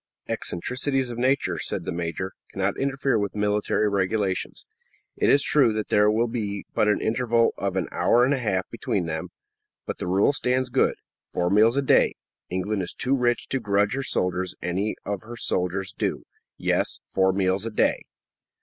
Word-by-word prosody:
"Eccentricities 130 +7 -1
of 120 - -6
nature," 130 +3 +1
said - - -3
the - - -2
major, 85 +2 -3 0.2
"cannot 95 +1 -1
interfere 135 -3 0
with 100 0 -3
military 105 +1 +1
regulations. 100 -1 -1 0.5
It - - +2
is 140 0 +5
true 130 -7 +4
that 110 0 -3
there 105 0 +4
will 110 +2 +2
be 105 -4 -4
but 105 - +2
an 105 - +3
interval 115 0 +2
of 100 -2 -2
an 95 -4 0
hour 120 - +3
and 135 +3 +3
a 135 - 0
half 95 -6 -1
between 90 - -2
them, 80 -1 -3 0.6
but - - -5
the - - -3
rule 95 +9 +3
stands 130 -1 0
good 130 +1 +2 0.3
four 90 0 -1
meals 110 +5 +5
a 140 - +2
day. - - +4 0.3
England 95 +3 -1
is 90 - -4
too 130 +2 0
rich 120 -2 0
to 135 - 0
grudge 100 -2 +1
her 135 - -1
soldiers 90 -7 0
any 95 +5 -1
of 100 -2 -3
her 120 +2 -9
soldiers' 95 -2 -1
due. - - -2 0.3
Yes; - - 0
four 95 0 +2
meals 95 +2 0
a - - -2
day." 105 - +1
105 Hz, 180 wpm, -25 LUFS, 95-125 Hz, 0.6 s, is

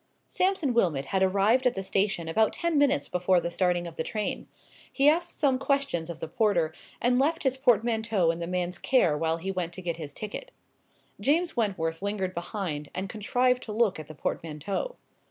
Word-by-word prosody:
Sampson 365 -8 +1
Wilmot 165 -12 +1
had 190 +5 -1
arrived 200 +7 +3
at 245 - 0
the 195 - -3
station 195 -3 0
about 220 +7 +2
ten 340 -2 -1
minutes 285 -1 +3
before 180 0 +2
the 170 0 -3
starting 175 0 +1
of 170 -1 -9
the - - -1
train. 210 +3 -3 0.4
He 275 +1 +3
asked 340 +3 +2
some 270 -3 +2
questions 270 - 0
of 170 - -6
the - - -4
porter, 175 -5 +1 0.3
and 245 +1 +2
left 320 +5 +1
his 265 -2 +2
portmanteau 225 - +2
in 165 - -6
the 170 - -3
man's 180 0 -2
care 250 - +3
while 160 +1 0
he 190 +3 -3
went 180 -2 -3
to 185 - -6
get 170 -2 -2
his 150 -3 -7
ticket. 215 - -6 0.7
James 330 +5 +1
Wentworth 180 -8 -1
lingered 200 -2 -2
behind, 170 -5 -4
and 190 +1 -3
contrived 250 +5 +1
to 220 - -7
look 215 -5 +1
at 155 - -8
the 155 - -10
portmanteau. 165 - -3
195 Hz, 190 wpm, -28 LUFS, 170-250 Hz, 0.7 s, arrived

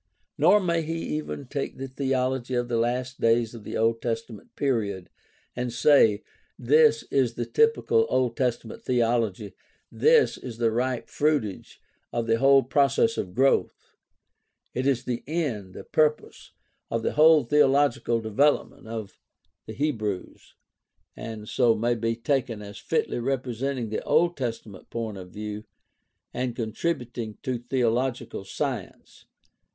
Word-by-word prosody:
Nor 180 +8 +5
may 170 -3 0
he 165 +1 -3 0.2
even 150 -2 -6
take 140 +2 -4
the 135 - -5
theology 130 -1 -1
of 120 0 -1
the 120 - 0
last 125 +3 -2
days 115 0 +2
of 115 -3 -10
the - - -4
Old 115 +1 +1
Testament 115 -2 -5
period 105 -9 -1 0.4
and 125 0 -3
say, 115 -5 +4 0.3
"This 150 +4 +4
is 125 -4 +1
the 120 - -2
typical 455 0 +2
Old 125 -2 +1
Testament 120 -3 -2
theology; 115 -4 0 0.4
this 465 0 +3
is 120 -3 -8
the 115 -1 +1
ripe 125 +1 -1
fruitage 145 -10 -1 0.3
of 120 -1 -1
the 115 0 +1
whole 135 0 +6
process 140 - +2
of 90 0 -5
growth; 135 +2 +1 0.8
it 130 +2 -1
is 130 -3 +1
the 120 -2 -3
end, 130 - -3
the - - -8
purpose, 155 -1 0 0.4
of 115 -1 -2
the - - -1
whole 155 -1 +6
theological 135 -3 +2
development 110 +3 +1
of 110 -3 -7 0.5
the 110 - -6
Hebrews, 110 -8 -3 0.6
and 110 -2 -7
so 120 -1 +3
may 120 +2 +1
be 115 0 -1
taken 115 -3 -1
as 100 0 -9
fitly - - -1
representing 130 -1 -2
the 110 - -3
Old 170 +3 +2
Testament 115 -6 -6
point 110 -4 -4
of 90 -1 -10
view 105 +2 -6 0.7
and 125 -1 -2
contribution 120 -2 -3
to 130 -3 -2
theological 120 -2 -1
science." 95 - -5
120 Hz, 140 wpm, -26 LUFS, 115-140 Hz, 0.8 s, whole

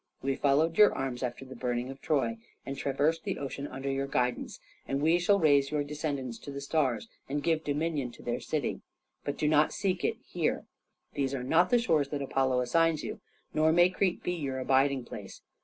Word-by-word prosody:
We 135 0 0
followed 155 +6 +2
your 210 - +8
arms 130 -2 -3
after 125 +1 -4
the 130 0 -10
burning 125 +1 -2
of 135 0 -11
Troy, 160 - 0 0.3
and 135 - -4
traversed 145 +4 0
the 195 -2 -2
ocean 140 +1 -5
under 135 +1 -6
your 135 0 -1
guidance, 125 -2 -1 0.3
and 135 - -1
we 160 +4 +3
shall 200 +3 +4
raise 140 -4 +4
your 150 -1 0
descendants 145 -4 -4
to 140 - -8
the 140 - -5
stars 140 - 0 0.2
and 145 +1 -2
give 160 0 +1
dominion 150 -2 -1
to - - -14
their 120 0 -2
city. 150 -4 -2 0.4
But 145 - -3
do 150 - +1
not 150 0 +4
seek 190 -3 -1
it - - 0
here. - - -1 0.5
These 140 -1 -1
are 125 - -3
not 165 +7 +3
the 245 - +5
shores 160 - +2
that 145 -1 -3
Apollo 130 -2 +1
assigns 165 +5 +2
you, - - -6 0.3
nor 155 +1 +4
may 175 +2 +5
Crete 185 -1 0
be 180 - -1
your 140 -6 -3
abiding 135 0 +2
place. - - -9
140 Hz, 205 wpm, -30 LUFS, 135-160 Hz, 0.5 s, your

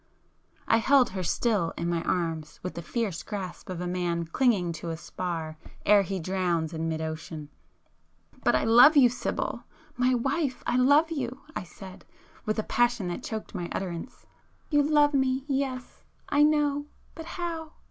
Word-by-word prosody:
I 225 - +5
held 265 +2 +4
her 190 -1 -3
still 190 -1 0
in 170 - -2
my 170 -1 0
arms 165 -3 -2
with 180 - -4
the 170 - -6
fierce 205 -1 -2
grasp 195 -5 -6
of 180 -2 -4
a 180 - -3
man 175 -1 -1
clinging 190 -2 +1
to 170 - -4
a 165 - -3
spar 165 -2 -5 0.3
ere 205 -1 +6
he 195 0 -3
drowns 175 -2 -1
in 165 0 -2
mid 160 0 -2
ocean. 160 -1 -6 0.9
"But - - +3
I - - +2
love 245 +7 +7
you 255 -3 +7
Sibyl!——my 250 +1 -2
wife, 270 +2 -1
I - - 0
love 285 +6 +4
you!" 260 -4 -4
I - - -2
said, 185 +1 -11 0.4
with 215 - 0
a 215 - 0
passion 240 -6 +1
that 175 - -4
choked 220 -1 -5
my 175 -1 -4
utterance. 180 +5 -5 0.5
[p 295 - +3
310]"You 290 +1 +3
love 295 -1 +5
me,—yes, 265 -1 -1 0.3
I 290 - +3
know, 295 -1 +2 0.3
but 325 - -8
how? 330 -3 -4
215 Hz, 170 wpm, -27 LUFS, 170-270 Hz, 0.9 s, love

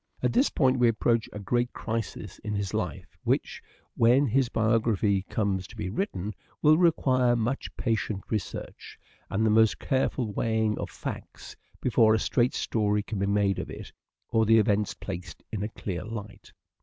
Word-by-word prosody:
At - - +2
this 260 +4 +4
point 130 -3 +2
we 120 - +5
approach 115 0 +1
a - - -7
great 120 +4 -1
crisis 110 -3 -4
in 105 -1 -4
his 100 -2 -2
life - - -4
which, - - -1 0.3
when 125 +5 +4
his 130 0 +2
biography 110 -3 +2
comes 95 -4 -1
to - - -14
be 105 -4 -4
written, 105 - -3 0.3
will 155 0 +7
require 130 -8 +3
much 120 +4 -1
patient 110 -4 -1
research, 105 -4 -5 0.3
and 110 +3 +1
the 110 - +3
most 110 0 +4
careful 130 -4 -1
weighing 110 -1 +1
of - - -4
facts, - - -7 0.3
before 115 -3 +4
a - - +1
straight 120 +4 +1
story 105 -2 0
can 105 -2 -4
be 100 - 0
made 100 -1 +2
of - - -5
it - - -8 0.4
or 110 - +3
the 115 0 +6
events 105 -1 +2
placed 90 -2 -7
in 105 - -3
a 105 - -2
clear 95 -5 -5
light. 105 -2 -8
110 Hz, 170 wpm, -27 LUFS, 105-120 Hz, 0.4 s, will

